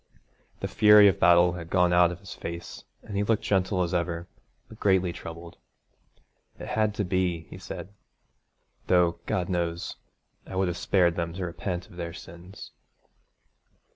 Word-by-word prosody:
The - - -2
fury 105 -1 +7
of 100 0 +2
battle 85 0 +5
had 85 -2 -7
gone 90 -1 +3
out 90 0 +5
of 90 +2 -9
his 100 - -9
face, 85 0 -8 0.2
and 105 - -8
he 100 - +1
looked 110 +1 0
gentle 95 -1 +1
as 85 +1 -3
ever, 85 -1 -2 0.4
but 110 - -14
greatly 95 -3 +2
troubled. 85 +1 -9 1.0
'It - - -8
had 110 -1 0
to 105 - -1
be,' 90 -2 0
he - - -9
said, - - -8 1.0
'though, 90 -2 +3
God 90 -2 -1
knows, 85 -2 -3 0.5
I 95 - -8
would 95 -1 +1
have 85 - -4
spared 90 -4 +2
them 85 -1 -2
to 90 +1 -4
repent 90 +1 -4
of 90 - -16
their 85 -1 -5
sins.' 85 +3 -11
90 Hz, 165 wpm, -27 LUFS, 85-95 Hz, 1.0 s, fury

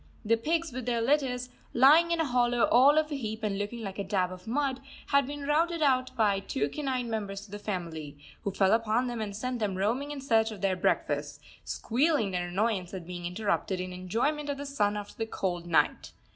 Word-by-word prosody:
The 230 +2 +4
pigs 325 +7 -1
with 250 -1 -5
their 235 -1 +1
litters, 250 -1 +1 0.3
lying 300 +7 +7
in 340 -1 +1
a 325 - +2
hollow 245 -2 +2
all 275 +5 +6
of 310 0 +2
a - - -1
heap 220 -4 -4
and 200 -2 -1
looking 225 +3 -4
like 195 -1 -6
a - - 0
dab 185 -2 0
of 185 +1 -10
mud, 270 +2 0 0.3
had 280 -2 +3
been 290 0 -6
routed 325 +3 +1
out 255 -2 +3
by 210 -4 +2
the 195 - -14
two 140 +2 0
canine 260 - -2
members 205 -3 -4
of 200 - -17
the 205 - -6
family, 165 -8 -5 0.2
who - - -2
fell 195 0 +2
upon 225 +2 +2
them 240 -2 -3
and 205 -2 -4
sent 250 +3 -3
them 205 -4 -1
roaming 235 +9 0
in 295 -1 -5
search 225 -5 +2
of 215 -4 -8
their 195 -2 +2
breakfasts, 180 - -1 0.2
squealing 255 -3 +1
their 180 -1 -2
annoyance 190 0 -1
at 180 -3 -7
being 175 0 -5
interrupted 190 0 -1
in 185 0 -4
enjoyment 235 +12 -1
of 285 - -2
the 285 - -5
sun 210 -7 0
after 205 0 -7
the 225 - -1
cold 175 -5 -3
night. 170 - +1
225 Hz, 220 wpm, -29 LUFS, 195-270 Hz, 0.3 s, lying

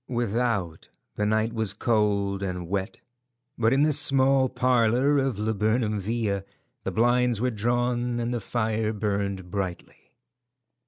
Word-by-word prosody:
Without, 115 -7 -1 0.3
the 105 - 0
night 110 +2 +1
was 110 -3 -1
cold 100 -3 0
and 90 -3 -4
wet, 95 +3 -3 0.6
but 115 -1 +2
in 135 +2 +3
the 155 0 +3
small 135 -1 +3
parlour 125 +3 +2
of 135 -5 -1
Laburnam 110 +1 0
Villa 100 -1 -2 0.4
the - - -2
blinds 120 0 +2
were 125 +2 0
drawn 120 +2 -1
and 120 +1 -2
the 120 - -2
fire 110 -2 -1
burned 100 -3 -3
brightly. 95 -3 -6
110 Hz, 130 wpm, -26 LUFS, 100-120 Hz, 0.6 s, in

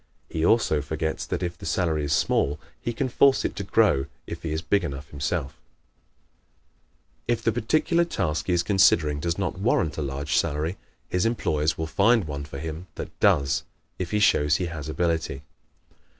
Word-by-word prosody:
He 80 - -2
also 85 -6 +3
forgets 80 +2 -3
that - - -2
if 85 -1 -2
the - - -11
salary 80 -4 0
is 70 - -3
small 75 0 +1 0.2
he 120 - -2
can 130 +3 -1
force 135 +2 +4
it - - -2
to - - -2
grow 70 0 +3 0.2
if 85 0 -7
he 80 -1 -4
is 80 +2 -2
big 100 +4 +2
enough 70 -3 -5
himself. 70 -2 -3 1.7
If 115 -1 0
the 115 - +3
particular 155 +9 +2
task 80 - -2
he 90 - +2
is 85 0 +2
considering 85 -6 +3
does 85 +2 -1
not 95 -1 -2
warrant 85 -8 +1
a - - -1
large 70 +1 -2
salary, 80 +3 0 0.3
his 90 +4 +1
employers 80 -9 0
will 80 - -2
find 100 +6 +3
one 70 -1 -5
for 70 -1 -8
him 80 +4 -6
that - - -6
does 70 -1 +3 0.4
if 90 -2 -3
he 105 - +1
shows 75 -7 +4
he 90 - -1
has 80 -3 -6
ability. 80 -4 -1
80 Hz, 180 wpm, -25 LUFS, 75-95 Hz, 1.7 s, force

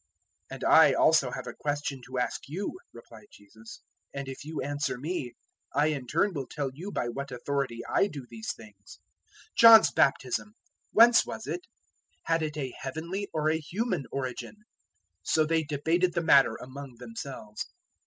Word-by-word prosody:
021:024 - - -5
"And - - -9
I - - +7
also - - +4
have - - -6
a - - -6
question 145 -2 -3
to 130 0 -6
ask 125 - -1
*you*," 190 +7 -3 0.2
replied 115 -2 -14
Jesus, 110 +2 -14 0.3
"and 140 -1 -4
if 135 +1 -7
you 155 +1 -6
answer 145 -1 -2
me, 140 -3 -4 0.4
I 150 +2 +3
in 140 -5 -3
turn 175 +9 +1
will 140 -5 -4
tell 140 -2 -3
you 180 +9 -7
by 120 - -2
what 140 +3 -5
authority 125 -1 -2
I - - +2
do 140 -9 -8
these 115 -2 -5
things. 105 -4 -14 0.5
021:025 - - -51
John's 230 -1 +9
Baptism, 140 - +1 0.4
whence 230 +1 +7
was - - -7
it? 360 +1 -5 0.6
had 165 0 +1
it 155 -1 -3
a 135 -4 -4
heavenly 170 +9 -4
or 155 0 +1
a 160 - 0
human 180 - -3
origin?" 135 - -5 0.6
So 155 - +2
they 160 +1 +2
debated 160 +5 0
the 170 - 0
matter 140 -4 +5
among 130 0 -9
themselves. 115 -2 -7
140 Hz, 170 wpm, -28 LUFS, 125-165 Hz, 0.6 s, John's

